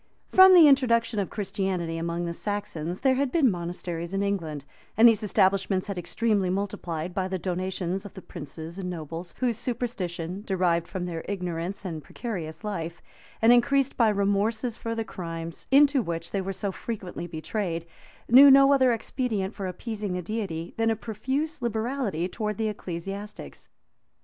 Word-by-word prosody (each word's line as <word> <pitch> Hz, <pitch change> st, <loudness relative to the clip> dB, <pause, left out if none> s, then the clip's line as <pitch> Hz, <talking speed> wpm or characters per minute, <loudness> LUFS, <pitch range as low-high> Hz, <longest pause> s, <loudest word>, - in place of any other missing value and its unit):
From 375 Hz, 0 st, +9 dB
the 335 Hz, -4 st, +9 dB
introduction 230 Hz, -5 st, +3 dB
of 195 Hz, -, -1 dB
Christianity 190 Hz, -4 st, -2 dB
among 170 Hz, +1 st, -2 dB
the 170 Hz, -, -3 dB
Saxons, 180 Hz, -4 st, -4 dB
there 265 Hz, -1 st, +4 dB
had 265 Hz, 0 st, 0 dB
been 280 Hz, -7 st, +4 dB
monasteries 175 Hz, 0 st, -4 dB
in 195 Hz, -, +1 dB
England; 165 Hz, -8 st, -2 dB, 0.3 s
and 230 Hz, +2 st, +9 dB
these 225 Hz, -2 st, +4 dB
establishments 190 Hz, -2 st, +2 dB
had 200 Hz, -3 st, -4 dB
extremely 205 Hz, 0 st, 0 dB
multiplied 180 Hz, -3 st, -3 dB
by 190 Hz, -1 st, -1 dB
the 190 Hz, 0 st, -2 dB
donations 185 Hz, +1 st, -2 dB
of 205 Hz, -, -11 dB
the 190 Hz, -, -8 dB
princes 160 Hz, +4 st, -8 dB
and 180 Hz, -1 st, -3 dB
nobles, 165 Hz, +1 st, -6 dB
whose 240 Hz, -3 st, +1 dB
superstition, 195 Hz, -8 st, -3 dB
derived 175 Hz, -4 st, +1 dB
from 185 Hz, -2 st, -4 dB
their 165 Hz, -2 st, -4 dB
ignorance 180 Hz, 0 st, -4 dB
and 160 Hz, -5 st, -5 dB
precarious 180 Hz, -, -6 dB
life, 170 Hz, -5 st, -4 dB, 0.4 s
and 230 Hz, +2 st, +8 dB
increased 275 Hz, +2 st, +3 dB
by 230 Hz, -3 st, +4 dB
remorses 210 Hz, +4 st, 0 dB
for 230 Hz, -1 st, -4 dB
the 225 Hz, -, -1 dB
crimes 165 Hz, -5 st, -7 dB
into 280 Hz, 0 st, +5 dB
which 165 Hz, -4 st, -4 dB
they 195 Hz, -, -1 dB
were 190 Hz, +1 st, -3 dB
so 195 Hz, +1 st, -3 dB
frequently 190 Hz, -5 st, -6 dB
betrayed, 170 Hz, +1 st, -3 dB, 0.4 s
knew 270 Hz, +4 st, +9 dB
no 275 Hz, +1 st, +7 dB
other 260 Hz, -2 st, +4 dB
expedient 225 Hz, -3 st, -2 dB
for 195 Hz, -2 st, -4 dB
appeasing 205 Hz, +1 st, -4 dB
the 180 Hz, 0 st, -3 dB
Deity, 180 Hz, -5 st, -4 dB
than 225 Hz, 0 st, +2 dB
a 225 Hz, -, +2 dB
profuse 265 Hz, +8 st, -3 dB
liberality 225 Hz, -, -1 dB
towards 210 Hz, +1 st, -3 dB
the 220 Hz, -1 st, 0 dB
ecclesiastics. 195 Hz, +1 st, -7 dB
195 Hz, 165 wpm, -26 LUFS, 175-230 Hz, 0.4 s, From